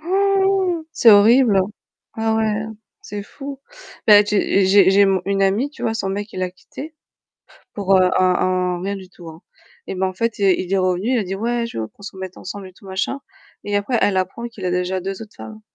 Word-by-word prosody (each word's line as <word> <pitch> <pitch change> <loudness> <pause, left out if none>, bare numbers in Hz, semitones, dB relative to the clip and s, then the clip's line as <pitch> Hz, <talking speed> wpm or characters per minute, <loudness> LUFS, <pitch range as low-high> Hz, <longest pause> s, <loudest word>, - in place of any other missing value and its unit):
Han! 385 -1 +1
C'est 230 - +6
horrible. 215 0 +6 0.5
Ah 225 0 0
ouais, 220 -1 +1 0.5
c'est 205 -1 -6
fou. 275 +5 -9 0.5
Là 210 -1 +8
j'ai 200 -2 +2
j'ai 190 -1 +6
j'ai 200 +1 +5
mon 190 -1 +2
une 195 0 0
amie, 210 +9 +1
tu - - -13
vois 225 - 0
son 195 - -2
mec 205 +2 -5
il 185 - -5
l'a 185 - -1
quittée 290 - -11 0.8
pour, 195 -2 +2
heu, 185 -1 +4
un 185 - +4
un 180 -1 0
rien 200 +1 -3
du 190 -1 -11
tout 175 -2 -13 0.6
et - - -5
ben 190 +1 0
en 185 - -3
fait, 230 +3 -2
il 200 - 0
est 185 - +3
il 185 - -7
est 195 - +3
revenu, 185 +5 0
il 245 - +2
a 210 - -1
dit: 190 +1 -4
«Ouais, 235 +2 -1
je 230 - -7
veux 110 -1 -3
qu'on - - -22
se 200 - -8
remette 190 -1 -8
ensemble 195 +1 -8
et 185 - -16
tout 195 - -18
machin» 195 +9 -3 0.4
et 205 0 -1
après, 225 +4 0
elle 195 -2 +2
apprend 185 +5 -2
qu'il 215 -5 -10
a 180 - 0
déjà 180 +1 -1
2 195 +3 -5
autres 215 - -13
femmes. 215 0 -10
200 Hz, 230 wpm, -20 LUFS, 185-230 Hz, 0.8 s, Là